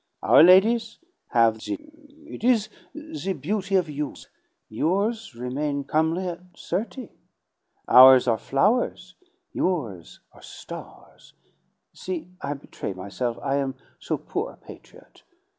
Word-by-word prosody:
Our -, -, +6 dB
ladies 215 Hz, +6 st, +5 dB, 0.3 s
have 115 Hz, -2 st, +3 dB
the 215 Hz, -, -4 dB, 0.5 s
it 310 Hz, -, -10 dB
is 230 Hz, -4 st, +3 dB, 0.3 s
the 310 Hz, -10 st, -5 dB
beauty 195 Hz, +6 st, -2 dB
of 180 Hz, -3 st, +2 dB
youth; 150 Hz, -1 st, -6 dB, 0.4 s
yours 200 Hz, -, -1 dB
remain 140 Hz, +4 st, -3 dB
comely 160 Hz, +5 st, 0 dB
at 175 Hz, -1 st, -5 dB, 0.2 s
thirty. 225 Hz, +6 st, -4 dB, 0.8 s
Ours 130 Hz, 0 st, +8 dB
are 115 Hz, -3 st, +2 dB
flowers, 185 Hz, -, 0 dB, 0.4 s
yours 120 Hz, -, -3 dB
are -, -, -18 dB
stars! -, -, -12 dB, 0.6 s
See, 180 Hz, -2 st, -6 dB
I 145 Hz, +1 st, -3 dB
betray 135 Hz, -7 st, -7 dB
myself, 100 Hz, +6 st, -4 dB
I 140 Hz, 0 st, 0 dB
am 135 Hz, -1 st, -2 dB, 0.2 s
so -, -, -2 dB
poor -, -, -4 dB
a -, -, -20 dB
patriot. -, -, -16 dB
160 Hz, 120 wpm, -24 LUFS, 130-200 Hz, 0.8 s, Ours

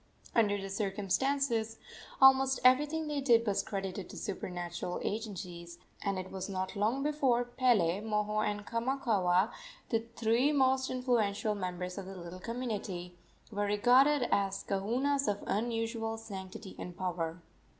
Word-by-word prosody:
Under 205 Hz, -3 st, +3 dB
the 195 Hz, 0 st, -6 dB
circumstances 225 Hz, +4 st, 0 dB, 0.4 s
almost 265 Hz, 0 st, +6 dB
everything 295 Hz, +5 st, +4 dB
they 295 Hz, -1 st, -1 dB
did 235 Hz, -4 st, +4 dB
was 205 Hz, -3 st, +1 dB
credited 195 Hz, -2 st, -4 dB
to -, -, -9 dB
supernatural 175 Hz, -3 st, -4 dB
agencies, 180 Hz, -5 st, -5 dB, 0.2 s
and 195 Hz, -1 st, -1 dB
it 185 Hz, 0 st, -5 dB
was 190 Hz, +1 st, -5 dB
not 190 Hz, 0 st, -3 dB
long 220 Hz, +7 st, +1 dB
before 275 Hz, -5 st, +2 dB
Pele, 235 Hz, -8 st, +2 dB
Moho 210 Hz, 0 st, 0 dB
and 205 Hz, -1 st, -2 dB
Kamakaua 230 Hz, -6 st, +1 dB, 0.4 s
the 225 Hz, -, +2 dB, 0.2 s
three 235 Hz, +5 st, +3 dB
most 265 Hz, -2 st, +3 dB
influential 225 Hz, -5 st, +1 dB
members 180 Hz, -1 st, -4 dB
of 190 Hz, -, -7 dB
the 195 Hz, -, -8 dB
little 175 Hz, +1 st, -8 dB
community 200 Hz, -6 st, -4 dB, 0.4 s
were 205 Hz, -1 st, -1 dB
regarded 250 Hz, +6 st, +4 dB
as 195 Hz, -1 st, +1 dB
kahunas 255 Hz, +9 st, 0 dB
of 205 Hz, -1 st, -1 dB
unusual 225 Hz, +1 st, -1 dB
sanctity 195 Hz, -2 st, -8 dB
and 175 Hz, -1 st, -7 dB
power. 170 Hz, -2 st, -2 dB
210 Hz, 135 wpm, -32 LUFS, 190-250 Hz, 0.4 s, almost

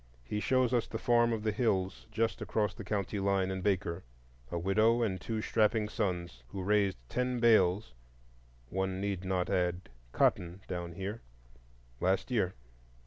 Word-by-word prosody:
He 105 Hz, +13 st, -3 dB
shows 125 Hz, +4 st, +2 dB
us 120 Hz, -2 st, +2 dB
the 110 Hz, -, -4 dB
farm 120 Hz, 0 st, +3 dB
of 110 Hz, -2 st, -2 dB
the 110 Hz, -, +1 dB
Hills 100 Hz, -5 st, 0 dB
just 115 Hz, +1 st, 0 dB
across 105 Hz, -4 st, 0 dB
the 115 Hz, -, -8 dB
county 100 Hz, +1 st, -2 dB
line 95 Hz, -1 st, +1 dB
in 95 Hz, 0 st, -3 dB
Baker,—a 60 Hz, -9 st, -3 dB
widow 110 Hz, +7 st, +3 dB
and 95 Hz, -5 st, -1 dB
two 110 Hz, +1 st, -3 dB
strapping 110 Hz, -1 st, +2 dB
sons, 90 Hz, -, -2 dB
who 95 Hz, +9 st, -5 dB
raised 100 Hz, -2 st, +2 dB
ten 125 Hz, -, -1 dB
bales 105 Hz, -, +4 dB, 0.8 s
(one 95 Hz, +2 st, -1 dB
need 100 Hz, -2 st, -2 dB
not 95 Hz, -1 st, 0 dB
add 90 Hz, 0 st, 0 dB, 0.2 s
"cotton" 90 Hz, +8 st, +1 dB
down 85 Hz, -2 st, -4 dB
here) 100 Hz, +6 st, -5 dB, 0.8 s
last 95 Hz, +7 st, +1 dB
year. 100 Hz, -7 st, +1 dB
95 Hz, 150 wpm, -32 LUFS, 90-110 Hz, 0.8 s, bales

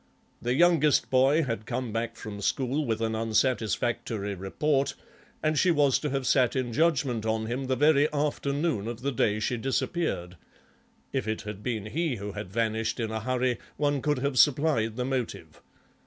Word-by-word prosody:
The 120 Hz, +1 st, 0 dB
youngest 160 Hz, -2 st, +4 dB
boy 135 Hz, +5 st, +4 dB
had 115 Hz, -5 st, -4 dB
come 125 Hz, -4 st, -3 dB
back 115 Hz, 0 st, -2 dB
from 105 Hz, -2 st, -7 dB
school 135 Hz, +7 st, 0 dB
with 110 Hz, -1 st, -1 dB
an 110 Hz, 0 st, 0 dB
unsatisfactory 110 Hz, -2 st, 0 dB
report, 135 Hz, +9 st, 0 dB, 0.5 s
and 155 Hz, -1 st, +2 dB
she 185 Hz, -, +3 dB
was 145 Hz, -5 st, +3 dB
to 150 Hz, -, -2 dB
have 135 Hz, -1 st, -2 dB
sat 125 Hz, -2 st, +3 dB
in 125 Hz, -3 st, -1 dB
judgement 135 Hz, -6 st, +1 dB
on 110 Hz, 0 st, -1 dB
him 125 Hz, +4 st, -3 dB
the 130 Hz, 0 st, 0 dB
very 150 Hz, +1 st, +4 dB
afternoon 145 Hz, -4 st, -1 dB
of 120 Hz, 0 st, -5 dB
the 140 Hz, -, 0 dB
day 110 Hz, -4 st, +1 dB
she 120 Hz, +3 st, -1 dB
disappeared—if 115 Hz, -, -4 dB
it 110 Hz, 0 st, -2 dB
had 105 Hz, -1 st, -7 dB
been 110 Hz, -3 st, -3 dB
he 155 Hz, +5 st, -1 dB
who 100 Hz, -1 st, -5 dB
had 90 Hz, -, -7 dB
vanished 115 Hz, +2 st, -1 dB
in 110 Hz, -2 st, -2 dB
a 110 Hz, -, -2 dB
hurry 125 Hz, +1 st, 0 dB, 0.2 s
one 145 Hz, -1 st, +1 dB
could 150 Hz, 0 st, +1 dB
have 135 Hz, 0 st, 0 dB
supplied 140 Hz, -7 st, +3 dB
the 125 Hz, 0 st, -2 dB
motive. 120 Hz, -, -4 dB
125 Hz, 170 wpm, -28 LUFS, 110-145 Hz, 0.5 s, youngest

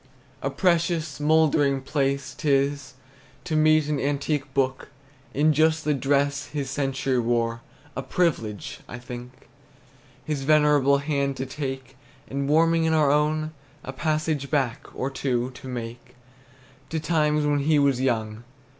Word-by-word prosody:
A 135 Hz, -, -1 dB
precious, 165 Hz, -2 st, 0 dB
mouldering 150 Hz, -2 st, +3 dB
pleasure 140 Hz, -1 st, -1 dB
't 155 Hz, -, -2 dB
is 140 Hz, 0 st, +1 dB, 0.5 s
To 155 Hz, -, -2 dB
meet 155 Hz, -1 st, +4 dB
an 150 Hz, -2 st, -1 dB
antique 145 Hz, 0 st, -1 dB
book, 130 Hz, -1 st, 0 dB, 0.4 s
In 150 Hz, +3 st, +3 dB
just 155 Hz, +1 st, +2 dB
the 150 Hz, -, +2 dB
dress 140 Hz, +1 st, 0 dB
his 140 Hz, -3 st, -4 dB
century 135 Hz, -2 st, 0 dB
wore; 115 Hz, 0 st, 0 dB, 0.3 s
A -, -, -2 dB
privilege, 115 Hz, -, -1 dB
I 120 Hz, -, -7 dB
think, 125 Hz, +1 st, -10 dB, 0.8 s
His 150 Hz, -3 st, -2 dB
venerable 145 Hz, -1 st, +4 dB
hand 140 Hz, -1 st, -1 dB
to 130 Hz, -, -3 dB
take, 130 Hz, -1 st, -6 dB, 0.3 s
And 140 Hz, +1 st, -3 dB
warming 165 Hz, +2 st, +4 dB
in 160 Hz, 0 st, +2 dB
our 150 Hz, -3 st, +4 dB
own, 155 Hz, +1 st, +1 dB, 0.3 s
A 130 Hz, -, -6 dB
passage 155 Hz, -1 st, -1 dB
back, 135 Hz, -6 st, -1 dB
or 135 Hz, +2 st, -2 dB
two, 125 Hz, -2 st, -1 dB
to 130 Hz, +1 st, -11 dB
make 120 Hz, 0 st, -7 dB, 0.7 s
To 160 Hz, -, -2 dB
times 150 Hz, -2 st, +1 dB
when 145 Hz, -1 st, +2 dB
he 150 Hz, +2 st, +2 dB
was 140 Hz, -3 st, +2 dB
young. 110 Hz, -3 st, -1 dB
140 Hz, 145 wpm, -25 LUFS, 130-155 Hz, 0.8 s, meet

